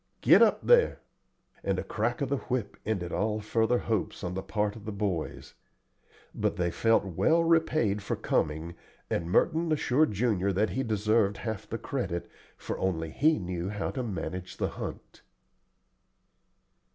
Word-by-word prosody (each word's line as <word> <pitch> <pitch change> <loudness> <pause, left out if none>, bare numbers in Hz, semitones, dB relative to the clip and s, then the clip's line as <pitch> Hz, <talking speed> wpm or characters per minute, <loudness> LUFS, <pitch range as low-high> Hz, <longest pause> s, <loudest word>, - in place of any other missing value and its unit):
Get - - +7
up - - +4
there;" 485 -1 +5 0.6
and - - 0
a - - -2
crack - - -2
of 140 - 0
the 140 - +1
whip 125 -5 -3
ended 95 -6 -1
all 105 0 0
further 110 +3 +1
hopes 110 -4 -2
on 90 0 -3
the 95 - -3
part 105 0 -1
of 110 - -11
the 110 - -3
boys. 100 -6 -3 0.8
But - - -1
they 85 -1 0
felt 115 +3 +3
well 160 - +2
repaid 155 -11 +2
for 100 - -2
coming, 80 +2 -1 0.4
and 85 0 -1
Merton 160 - +2
assured 150 -1 +2
Junior 100 -3 +1
that 105 +4 +1
he 130 - -1
deserved 110 -3 +1
half 110 -4 -5
the - - -2
credit, 85 0 -3 0.3
for - - -5
only 80 -4 -1
he 155 - +3
knew 90 -1 -3
how 105 -1 -3
to 130 - -3
manage 90 -4 -5
the - - 0
hunt. - - -8
105 Hz, 160 wpm, -29 LUFS, 90-125 Hz, 0.8 s, Get